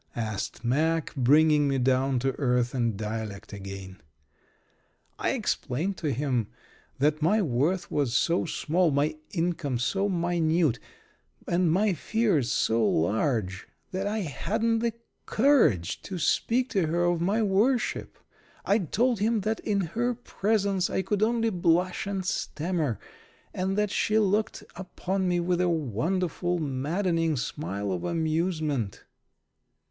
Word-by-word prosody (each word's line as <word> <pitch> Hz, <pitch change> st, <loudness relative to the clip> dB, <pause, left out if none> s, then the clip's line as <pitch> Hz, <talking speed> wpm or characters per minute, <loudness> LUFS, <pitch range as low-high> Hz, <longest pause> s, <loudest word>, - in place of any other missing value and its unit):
asked 110 Hz, -1 st, -4 dB
Mack, 160 Hz, +6 st, +1 dB
bringing 150 Hz, +2 st, +4 dB
me 135 Hz, -1 st, +1 dB
down 130 Hz, +1 st, +2 dB
to 135 Hz, +2 st, +1 dB
earth 125 Hz, -3 st, +1 dB
and 115 Hz, -5 st, 0 dB
dialect 105 Hz, -1 st, -5 dB
again. 95 Hz, -2 st, -8 dB, 1.2 s
I -, -, +1 dB
explained 165 Hz, +11 st, -2 dB
to 155 Hz, -4 st, -1 dB
him 125 Hz, -4 st, 0 dB, 0.5 s
that 150 Hz, +3 st, +1 dB
my 190 Hz, +8 st, +3 dB
worth 160 Hz, +6 st, 0 dB
was 140 Hz, -5 st, 0 dB
so 170 Hz, +6 st, +2 dB
small, 170 Hz, +2 st, +1 dB
my 150 Hz, +2 st, +1 dB, 0.2 s
income 165 Hz, -7 st, -1 dB
so 195 Hz, +12 st, 0 dB
minute, 170 Hz, -, +1 dB, 0.7 s
and 175 Hz, -1 st, +2 dB
my 200 Hz, +3 st, +2 dB
fears 180 Hz, -, +1 dB
so 115 Hz, 0 st, +2 dB
large 100 Hz, -, 0 dB, 0.2 s
that 190 Hz, +1 st, -2 dB
I 215 Hz, +1 st, -1 dB
hadn't 220 Hz, -, -1 dB
the 230 Hz, 0 st, 0 dB, 0.3 s
courage 215 Hz, -, +3 dB
to 190 Hz, -, -6 dB
speak 245 Hz, +9 st, +1 dB
to 190 Hz, -6 st, +1 dB
her 170 Hz, +2 st, +1 dB
of 175 Hz, -1 st, +1 dB
my 205 Hz, +6 st, +1 dB
worship. 215 Hz, +6 st, +1 dB, 0.5 s
I 205 Hz, +3 st, +3 dB
told 225 Hz, -, +1 dB
him 220 Hz, +1 st, +1 dB
that 220 Hz, +3 st, -1 dB
in 200 Hz, -2 st, 0 dB
her 235 Hz, +8 st, -1 dB
presence 200 Hz, -5 st, 0 dB
I 190 Hz, -, -1 dB
could 200 Hz, +2 st, -1 dB
only 230 Hz, 0 st, +2 dB
blush 180 Hz, +1 st, +1 dB
and 195 Hz, -2 st, -3 dB
stammer, 160 Hz, -, -2 dB, 0.5 s
and 190 Hz, +2 st, -1 dB
that 210 Hz, -1 st, +1 dB
she 215 Hz, -, +1 dB
looked 210 Hz, 0 st, +1 dB
upon 190 Hz, 0 st, -3 dB
me 175 Hz, -1 st, +1 dB
with 175 Hz, +1 st, 0 dB
a 180 Hz, -, +2 dB
wonderful, 170 Hz, -, -1 dB
maddening 165 Hz, +3 st, 0 dB
smile 100 Hz, -7 st, -3 dB
of 90 Hz, -2 st, -3 dB
amusement. 160 Hz, -, -1 dB
170 Hz, 135 wpm, -27 LUFS, 130-195 Hz, 1.2 s, bringing